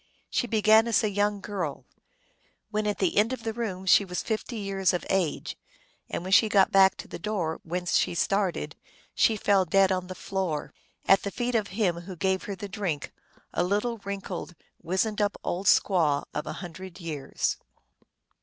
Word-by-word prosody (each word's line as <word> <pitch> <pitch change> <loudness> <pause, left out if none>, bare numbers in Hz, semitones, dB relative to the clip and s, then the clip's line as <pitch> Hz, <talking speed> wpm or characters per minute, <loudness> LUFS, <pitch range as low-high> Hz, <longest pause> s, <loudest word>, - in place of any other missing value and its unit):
She 245 - 0
began 220 0 +5
as 230 -2 +2
a 215 - +1
young 205 0 0
girl; 175 -11 -4 0.9
when 210 0 -1
at 205 - 0
the 190 -1 0
end 220 +5 +4
of 260 - -6
the 225 -2 -2
room 205 -5 -4
she 190 - +6
was 180 -2 -4
fifty 225 +2 -3
years 195 -2 0
of 180 - -2
age; 185 -6 -1 0.5
and - - -3
when 185 - -5
she 220 +2 +6
got 195 -2 +4
back 190 -1 +6
to - - -8
the - - -8
door 175 -5 -2
whence 175 +1 -1
she - - 0
started 195 0 0 0.4
she 225 -3 +3
fell 200 -1 +3
dead 195 +1 +3
on 185 -1 -1
the 185 - -7
floor, 180 -6 -3 0.3
at 195 - +5
the 200 - -3
feet 245 +4 -2
of 215 -3 +1
him 190 -4 0
who 175 +2 -8
gave 190 +2 0
her 200 - -4
the 200 +2 -6
drink, 185 -7 -3 0.4
a - - +1
little 210 +5 0
wrinkled, 195 -3 -6 0.3
wizened 190 +5 0
up 205 0 0
old 190 +3 -2
squaw 160 -7 +3
of 150 - -4
a - - -3
hundred 185 +2 -9
years. 155 -5 -2
195 Hz, 185 wpm, -27 LUFS, 180-210 Hz, 0.9 s, she